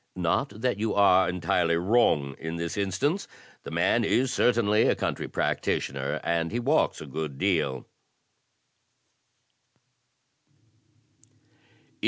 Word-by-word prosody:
Not 110 - -1
that 125 -5 0
you 110 0 -1
are 95 -2 +4
entirely 90 -1 0
wrong 85 - +2
in 80 +1 -5
this 85 0 -4
instance. 105 - -1 0.3
The - - -9
man - - +1
is 130 +1 +1
certainly 110 -3 +2
a - - +2
country - - -3
practitioner. 70 +1 -2
And 85 -1 -1
he 120 - -2
walks 140 +6 +1
a - - -7
good 75 0 -5
deal." 80 -9 0
95 Hz, 110 wpm, -26 LUFS, 80-115 Hz, 0.3 s, are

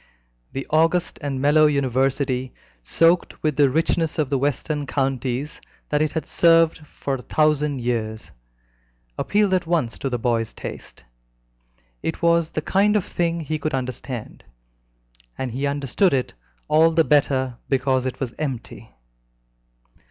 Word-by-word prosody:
The 135 - -4
august 165 +3 +2
and 140 -3 -3
mellow 150 +3 +5
University, 135 -2 0 0.3
soaked 165 - +2
with 155 -2 +1
the 145 -1 +4
richness 160 +2 0
of 150 -3 0
the 140 - +2
western 145 +1 -1
counties 135 0 -2 0.3
that 150 0 +1
it 155 -1 0
has 160 - -3
served 165 -1 +4
for 140 - -4
a 130 - -3
thousand 150 -2 +1
years, 110 -2 -3 0.8
appealed 205 - +1
at 180 -3 +1
once 160 -9 0
to 135 - -2
the 125 - -1
boy's 115 -1 -1
taste: - - -9 1.0
it 165 - -3
was 170 -1 +3
the 155 - -4
kind 205 +5 +2
of 205 - +1
thing 170 -1 -1
he 155 0 -3
could 150 -1 -2
understand, 130 -2 -5 0.9
and 130 -2 -3
he 135 +4 -2
understood 140 - +1
it 130 - -2 0.3
all 160 +2 +5
the 165 0 +3
better 135 -4 +1
because 130 -1 +1
it 130 - -5
was 130 -4 -3
empty. 135 -6 -5
145 Hz, 145 wpm, -22 LUFS, 130-160 Hz, 1.0 s, mellow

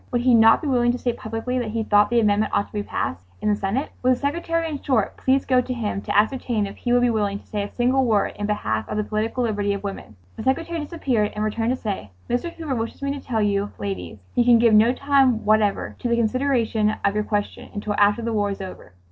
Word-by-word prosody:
Would 245 - +1
he 250 0 +4
not 225 +3 +6
be - - -2
willing 240 -3 +3
to - - -2
state 240 -1 -2
publicly 225 +3 -3
that 235 -3 -3
he 225 +1 -2
thought 205 -1 +4
the 240 - +3
amendment 210 -1 +2
ought 200 - +2
to - - -23
be 210 - -1
passed 95 - -4
in 210 - -1
the 210 - +3
Senate? 205 +8 -2
Would 255 +1 +4
the - - +1
secretary, 330 +4 -1
in 295 -3 -5
short, 245 -7 0
please 265 +1 +1
go 255 -1 +3
to 255 +1 -4
him 210 -4 -3
to - - -1
ascertain 220 -1 +1
if 195 - -7
he' 245 - -3
would 245 0 +4
be 245 - +3
willing 205 -3 0
to - - -16
say 210 - -3
a 200 - -4
single 255 +2 +1
word 220 -5 +1
in 205 - -3
behalf 110 - -2
of 210 - -3
the 210 - +1
political 220 +4 -2
liberty 205 -3 0
of 200 - -7
women? 110 - -7 0.2
The - - -5
secretary 330 +6 0
disappeared 270 -9 -1
and 210 - -2
returned 225 +2 -1
to 255 - +1
say, 195 - -4 0.2
"Mr. 245 +8 -1
Hoover 320 -5 -5
wishes 230 +2 -4
me 280 0 0
to 280 - -8
tell 225 -4 -1
you 200 0 0
ladies 95 -2 -5 0.2
he 245 - +3
can 240 -1 +6
give 230 -1 +4
no 220 +3 +6
time 270 -3 +2
whatever 215 -1 +1
to - - -2
the 235 - +3
consideration 230 -3 +1
of 200 - +2
your 210 0 0
question 205 -1 -3
until 210 0 -3
after 205 +3 +3
the 230 0 -2
war 205 -1 +1
is 200 - -5
over. 185 - -9
225 Hz, 255 wpm, -23 LUFS, 205-250 Hz, 0.2 s, not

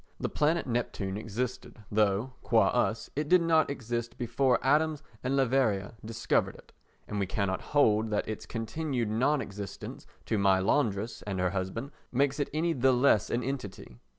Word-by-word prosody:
The - - -1
planet 155 +3 +1
Neptune 115 -6 -2
existed 115 +5 -4
though, 105 +4 +1
qua 110 -4 +3
us, 115 -2 0
it 150 +1 -2
did 180 -1 +6
not 160 -1 +3
exist 120 -3 -4
before 125 +1 +2
Adams 150 +2 +2 0.2
and 130 +2 0
Leverrier 125 -8 +1
discovered 115 +1 0
it, - - -17 0.3
and 105 - -3
we 100 - 0
cannot 100 -2 -1
hold 110 -6 +2
that 105 - -1
its 110 - -5
continued 120 +1 -2
non 135 +6 +2
existence 100 -3 -7 0.2
to 110 - 0
my 95 -1 +4
laundress 110 +1 0
and 95 -2 -2
her 90 -1 +1
husband 100 +8 -3 0.2
makes 140 +3 +1
it 145 - 0
any 165 +3 +1
the 130 -1 +3
less 125 -5 +3
an 120 +1 -1
entity. 110 - -6
120 Hz, 165 wpm, -29 LUFS, 105-140 Hz, 0.3 s, did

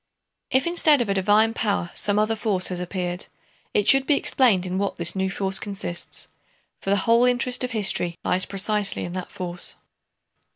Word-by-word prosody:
If 260 0 +1
instead 330 -4 +3
of 215 - -8
a - - +2
divine 210 +3 +3
power 200 -6 -1
some 205 0 0
other 215 +1 +1
force 205 -4 +1
has 180 -1 -4
appeared, 180 0 -4 0.4
it 205 - 0
should 270 0 +6
be 295 - +4
explained 225 -10 +2
in 185 +1 -3
what 200 0 -2
this 170 +2 +1
new 190 0 -1
force 195 0 0
consists, 195 -4 -5 0.5
for - - -5
the 200 - +3
whole 230 +1 +4
interest 250 0 +2
of 250 - -2
history 195 -6 0
lies 185 +1 +1
precisely 205 +1 -1
in 175 - -7
that 185 -1 -6
force. 175 -1 -4
200 Hz, 180 wpm, -23 LUFS, 185-225 Hz, 0.5 s, should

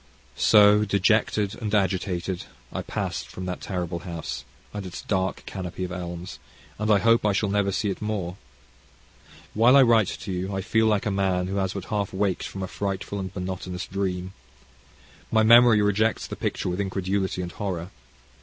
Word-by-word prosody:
So, 105 0 +6
dejected 105 0 +2
and 110 -1 -1
agitated, 95 -2 -1 0.3
I - - -2
passed - - -4
from 95 - -7
that 90 -1 -4
terrible 90 -3 -3
house, 85 -2 -6 0.3
and 105 -1 -4
its 90 -2 -7
dark 95 -1 -1
canopy 95 -1 -5
of 90 - -4
elms, 90 0 -6 0.4
and 110 0 -1
I 105 - +6
hope 115 +3 +4
I 105 -1 +2
shall 105 +1 0
never 100 0 +1
see 100 +1 0
it 95 - -7
more. 100 -5 -3 1.2
While 120 +5 +5
I 140 - +8
write 115 -5 +4
to 100 - -5
you 95 +2 -3
I 95 - -1
feel 110 +3 +2
like 105 -2 +1
a 105 - 0
man 95 -2 +1
who 95 +2 -3
has 95 -1 0
but 100 -2 -5
half 105 -3 -2
waked 95 -1 -1
from 95 - -6
a - - -3
frightful 100 +1 -3
and 95 -1 -4
monotonous 90 0 -4
dream. 95 -1 -3 1.0
My 110 -1 +4
memory 115 -1 +7
rejects 105 +2 +1
the - - -6
picture - - -2
with 90 +3 -1
incredulity 95 -1 -1
and 85 - -5
horror. 90 -3 -4
95 Hz, 180 wpm, -25 LUFS, 90-105 Hz, 1.2 s, I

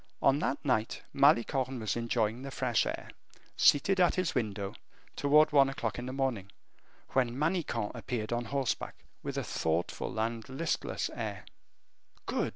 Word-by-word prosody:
On 135 +1 +4
that 140 - -2
night 115 -5 0
Malicorne 130 +1 +3
was 110 -3 -1
enjoying 115 0 0
the 135 - -6
fresh 125 -4 +1
air, - - -5 0.4
seated 190 +7 +4
at 180 - +4
his 185 -2 0
window, 100 -6 -2 0.4
toward 150 +2 +5
one 140 -2 +6
o'clock 120 -4 -3
in 125 - -5
the - - -3
morning, 130 -8 -2 0.6
when 125 -2 +1
Manicamp 150 - -1
appeared 120 -2 -3
on 120 0 -1
horseback, 135 +1 -2 0.3
with - - -4
a - - 0
thoughtful 80 +6 -2
and 115 0 -1
listless 160 +5 -2
air. - - -5 0.8
"Good!" - - 0
125 Hz, 150 wpm, -31 LUFS, 115-140 Hz, 0.8 s, one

